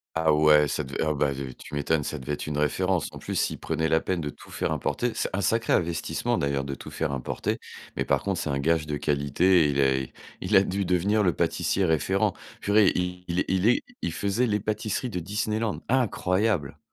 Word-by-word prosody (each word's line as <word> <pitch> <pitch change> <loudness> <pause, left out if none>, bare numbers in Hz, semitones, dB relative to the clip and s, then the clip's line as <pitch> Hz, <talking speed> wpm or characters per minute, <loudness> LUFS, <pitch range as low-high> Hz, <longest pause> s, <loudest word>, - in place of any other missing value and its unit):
Ah 80 -1 +3
ouais, 75 0 +5
ça - - -2
devait 65 +1 -3
oh 80 - +1
beh, 70 -1 +1
t 65 -1 -6
tu 75 - -10
m'étonnes, 75 +1 +1
ça 75 - -4
devait 70 +2 -4
être 75 - -5
une 75 -1 -2
référence. 90 +4 +1
En - - -9
plus, - - -5
s'il - - 0
prenait 80 - -1
la 80 0 +3
peine 90 -2 -1
de 75 - -3
tout - - -16
faire - - -2
importer. 125 0 -1
C'est - - -2
un 100 - 0
sacré 115 +4 +1
investissement 85 -1 0
d'ailleurs 70 -1 0
de 70 0 -4
tout - - -9
faire 80 -2 -2
importer, 65 -2 -2 0.4
mais - - -1
par - - +1
contre, 100 -3 -1
c'est - - -3
un 70 - 0
gage 80 +2 +1
de 75 -1 -2
qualité 75 +5 +3
et - - +2
il 70 -1 0
est 65 -1 +1 0.3
Il 95 +3 +1
a 95 - +6
dû 100 +1 -1
devenir 95 +4 +2
le 95 -4 +3
pâtissier 95 +6 0
référent. 80 +4 +1 0.3
Purée 105 -1 +4
il 90 0 -2 0.2
il 95 +2 +2
est 125 - +2 0.2
il - - -1
faisait 100 +8 0
les 105 -2 +1
pâtisseries 110 +3 -2
de 90 - -2
Disneyland. 105 +4 -2
Incroyable! 105 - +1
85 Hz, 220 wpm, -26 LUFS, 75-100 Hz, 0.4 s, a